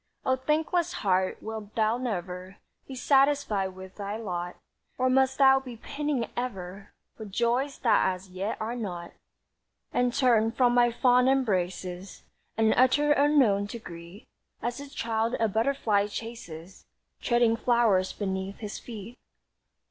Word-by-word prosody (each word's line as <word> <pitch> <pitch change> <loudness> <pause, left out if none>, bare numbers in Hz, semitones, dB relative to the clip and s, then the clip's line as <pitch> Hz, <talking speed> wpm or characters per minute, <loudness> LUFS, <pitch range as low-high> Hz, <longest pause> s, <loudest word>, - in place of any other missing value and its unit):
"O 260 - +3
thankless 315 +5 0
heart, 185 -1 +1
wilt 220 -1 -7
thou 220 +2 +1
never 185 -5 -5 0.3
Be 265 - -7
satisfied 270 -8 +2
with 190 0 -11
thy 205 +1 -4
lot, 180 -5 -4 0.4
Or 255 0 +2
must 265 0 +3
thou 270 -1 +6
be 250 -3 -9
pining 285 0 -2
ever 195 -5 -5 0.2
For 220 - -8
joys 240 +7 0
that 230 -4 +4
as 185 +1 -8
yet 195 +4 -3
are 225 +2 -3
not? 180 -7 -5 0.8
"And 245 0 +2
turn 230 -3 +3
from 245 -1 +3
my 240 0 +5
fond 250 +1 +4
embraces 185 -7 -1 0.3
An 220 0 +4
utter 270 +4 +3
unknown 275 -9 +3
to 220 - -6
greet, 170 -1 -11 0.3
As 240 +2 -3
a 285 0 -8
child 230 -3 -1
a 225 - +3
butterfly 220 -2 +1
chases 195 -6 -9 0.3
Treading 240 -2 +3
flowers 230 -6 +2
beneath 190 -1 -4
his 210 -2 -6
feet?" 230 +1 -9
225 Hz, 140 wpm, -27 LUFS, 195-255 Hz, 0.8 s, thou